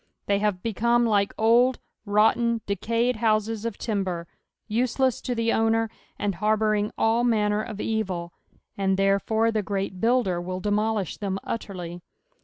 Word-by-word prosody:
They 200 0 +1
hare 210 0 +2
become 230 +5 +1
like 205 -3 +2
old, 240 +3 +4 0.3
rotten, 225 +3 +3
decayed 230 +5 0
houses 220 0 0
of 230 -3 -3
timber, 190 -6 -2 0.4
useless 250 +3 +1
to 250 - -2
the 230 0 +1
owner, 225 0 +1 0.3
and 205 -1 -1
harbouring 215 +1 +1
all 225 +2 +2
manner 210 -3 +2
of 215 -2 -7
evil, 190 -7 -2 0.4
and, 195 -1 +1
therefore, 200 +3 +2
the 220 -1 0
Orest 195 -2 -3
Builder 225 -7 +2
will 185 +1 -4
demolish 210 -1 -1
them 195 -2 -2
utterly. 180 -6 -5
215 Hz, 140 wpm, -25 LUFS, 200-230 Hz, 0.4 s, old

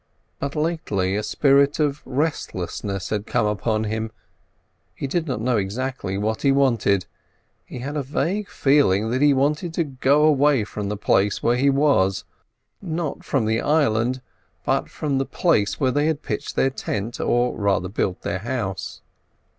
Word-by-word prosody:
But 140 +2 -4
lately 150 - -1
a 105 - 0
spirit 140 +5 +3
of 145 -1 0
restlessness 100 - -3
had 105 -1 -2
come 120 -3 +1
upon 110 +1 0
him; 110 +1 -2 0.9
he - - -4
did 165 +4 -1
not 125 -5 -2
know 120 0 +1
exactly 105 0 -3
what 110 +2 -1
he 140 - +3
wanted. 120 -8 +2 0.6
He - - -8
had 140 +4 -5
a 150 - 0
vague 180 +9 -2
feeling 115 -7 +2
that 130 +2 0
he 145 0 +6
wanted 150 +5 0
to 170 - +2
go 140 +1 +2
away 145 -4 +4
from 105 -1 -5
the 105 - -3
place 100 0 +1
where 120 - +3
he 135 +3 +3
was; 135 -10 +2 0.6
not 165 -5 -3
from 130 -6 0
the 110 +1 +1
island, 130 -4 +1 0.4
but - - 0
from 140 -3 -2
the - - +2
place 135 - +1
where 130 -2 +2
they 145 +3 +1
had 155 -2 -1
pitched - - -4
their 135 - +2
tent, 115 -3 -4
or 120 0 +1
rather 100 -3 0
built 95 -1 -2
their 100 -2 -2
house. 110 -4 -4
130 Hz, 165 wpm, -23 LUFS, 105-145 Hz, 0.9 s, he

